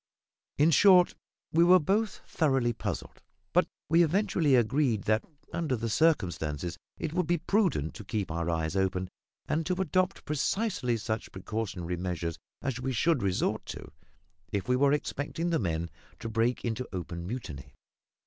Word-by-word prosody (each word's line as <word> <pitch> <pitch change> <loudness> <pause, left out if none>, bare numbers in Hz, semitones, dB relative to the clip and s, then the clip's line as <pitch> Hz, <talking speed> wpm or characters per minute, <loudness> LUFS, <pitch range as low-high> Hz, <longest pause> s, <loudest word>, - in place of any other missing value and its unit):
In 150 +3 +5
short, 180 +1 +6 0.4
we 165 +2 +5
were 180 +1 +8
both 200 +6 0
thoroughly 135 -7 +1
puzzled. 105 -5 -5 0.3
But - - +4 0.2
we 165 +3 +5
eventually 170 -4 +2
agreed 120 -2 +2
that, 110 +1 +2 0.3
under 160 -6 0
the 115 0 -3
circumstances, 85 - +1 0.2
it 155 - -4
would 180 -2 0
be 175 0 +2
prudent 170 - +1
to - - -9
keep 100 -2 -3
our 85 0 -2
eyes 80 +1 -1
open, 95 -1 0 0.4
and 155 +2 0
to 180 0 -1
adopt 185 +1 0
precisely 150 - 0
such 110 0 -3
precautionary 95 -3 -4
measures 85 -2 -3 0.2
as 130 -2 -2
we 130 +1 -1
should 160 +3 +2
resort 95 -2 0
to - - -8 0.6
if 100 0 -2
we 125 - +3
were 140 +2 +4
expecting 150 +3 -2
the 165 - +2
men 85 -3 -2 0.3
to - - -6
break 115 +3 0
into 120 +2 -3
open 85 -1 -5
mutiny. 95 - -7
120 Hz, 155 wpm, -29 LUFS, -, 0.6 s, were